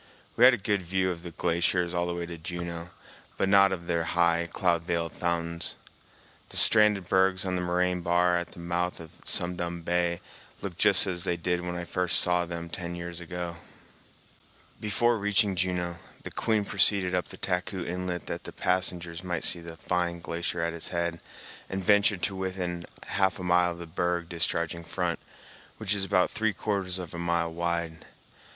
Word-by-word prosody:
We 120 - +7
had 130 - +9
a - - -7
good 100 -1 0
view 95 +1 0
of 85 -1 -6
the 85 - -7
glaciers 85 +1 0
all 85 0 0
the 85 - -2
way 85 0 -3
to 85 0 -7
Juneau, 85 +1 -6 0.5
but 95 - +1
not 100 0 +6
of 85 -2 -4
their 85 -1 0
high, 85 0 +2
cloud 85 -3 +1
veiled 85 -1 -2
fountains. 85 0 -2 0.7
The - - -2
stranded 105 -4 +5
bergs 95 +1 +3
on 90 -1 -1
the 90 - -1
moraine 90 0 +1
bar 90 0 +3
at 85 0 -2
the - - -12
mouth 85 +1 -2
of 80 -2 -10
Sum 90 0 0
Dum 85 -1 -3
Bay 85 0 +1 0.4
looked 95 -3 -6
just 105 -3 +5
as 90 -3 -3
they 85 - 0
did 90 +1 -1
when 90 0 -4
I 90 - -3
first 90 0 +2
saw 90 0 +2
them 85 0 -5
ten 85 0 -5
years 85 0 -6
ago. 85 0 -5 1.2
Before 115 +2 +2
reaching 105 -1 +3
Juneau, 90 -1 -1 0.3
the - - -7
Queen 110 -3 +1
proceeded 95 -2 +4
up 90 -1 0
the - - -9
Taku 90 0 -2
Inlet 90 -1 -3
that - - -5
the - - -6
passengers 90 -2 -1
might 90 -2 -2
see 85 - +5
the 85 -1 -9
fine 85 0 -1
glacier 85 0 -2
at 85 0 -1
its 85 - -3
head, 85 -1 -2 0.5
and 95 0 -3
ventured 100 -1 +4
to 100 - 0
within 90 -2 -3 0.2
half 95 -1 +1
a 90 - -7
mile 90 0 +4
of - - -11
the 85 - -7
berg 85 0 -1
discharging 85 0 -1
front, 90 0 -2 0.6
which 105 -2 0
is 100 -1 +1
about 90 -1 +2
three 110 -1 0
quarters 95 -2 -1
of 90 -3 -6
a 85 - -5
mile 85 -1 0
wide. 85 -1 -2
90 Hz, 190 wpm, -28 LUFS, 85-95 Hz, 1.2 s, had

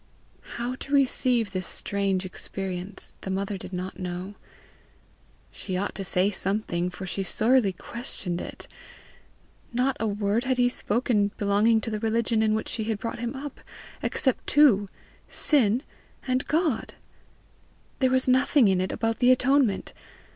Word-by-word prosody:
How 240 +1 -2
to 280 +1 -2
receive 250 -5 +2
the 185 -1 -2
strange 195 +1 -1
experience 185 0 -4
the - - -6
mother 195 +1 -2
did 190 - -8
not 185 +1 -5
know. 180 +2 -5 1.2
She 185 -2 -3
ought 200 +2 -2
to 195 - -3
say 185 +2 +2
something, 190 -3 -1
for 190 +2 -7
she 195 - -3
sorely 220 +2 +3
questioned 185 -3 -5
it! - - -7 1.0
Not 255 +2 +1
a 225 - 0
word 205 +3 0
had 260 -1 +1
he 245 0 +4
spoken 215 -3 +1
belonging 210 +3 +3
to 225 - -4
the 215 - -2
religion 225 0 +1
in 215 -1 +2
which 220 - -2
she 220 - -1
had 220 -1 -1
brought 230 +2 -5
him 240 +3 -3
up, 280 +1 -7 0.4
except 260 -3 0
two 230 -10 +5 0.4
SIN 250 -4 +3 0.4
and 255 0 0
GOD! 310 -7 0 1.0
There 260 -2 +3
was 260 0 +2
nothing 260 -1 +4
in 185 -1 +2
it 185 - -1
about 225 -1 -1
the 245 - +4
atonement! 255 -4 +2
220 Hz, 150 wpm, -26 LUFS, 195-250 Hz, 1.2 s, two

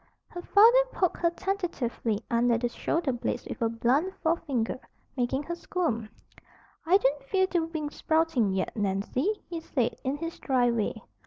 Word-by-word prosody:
Her 350 - -7
father 460 +7 +6
poked 365 -3 0
her 340 - +2
tentatively 335 - -2
under 235 0 +3
the 240 +1 -1
shoulder 320 +4 -1
blades 245 -1 -3
with - - -7
a 230 - +2
blunt 260 +11 +1
forefinger, 275 -8 0 0.4
making 260 +2 0
her 345 - -4
squirm. 320 -11 -2 0.8
"I 365 +3 +7
don't 285 -6 0
feel 375 +5 +2
the 365 -2 0
wings 315 -3 -5
sprouting 315 -9 +2
yet, 190 0 -2
Nancy," 215 - -1
he 340 -1 -4
said, 250 -7 -1
in 265 +2 -1
his 330 +2 -6
dry 250 -3 +2
way. 220 -1 -2
280 Hz, 160 wpm, -28 LUFS, 235-345 Hz, 0.8 s, I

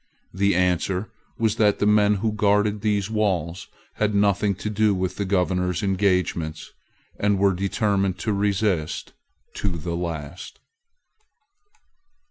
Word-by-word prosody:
The 100 +1 +2
answer 90 +2 0 0.3
was 110 -2 0
that 105 -2 +3
the - - 0
men 105 0 +4
who 110 +2 -1
guarded 105 0 +1
these 105 -1 0
walls 95 -6 -1 0.3
had 105 -1 0
nothing 100 0 +2
to 100 - -6
do 105 -1 +2
with 95 0 -2
the 100 - -1
Governor's 90 -1 0
engagements, 90 -5 0 0.5
and 105 -1 +2
were 100 0 +3
determined 100 0 0
to 105 +3 -1
resist 100 -5 -1 0.4
to 95 -4 -2
the 85 +2 -4
last. 85 -1 -6
100 Hz, 125 wpm, -23 LUFS, 90-105 Hz, 0.5 s, men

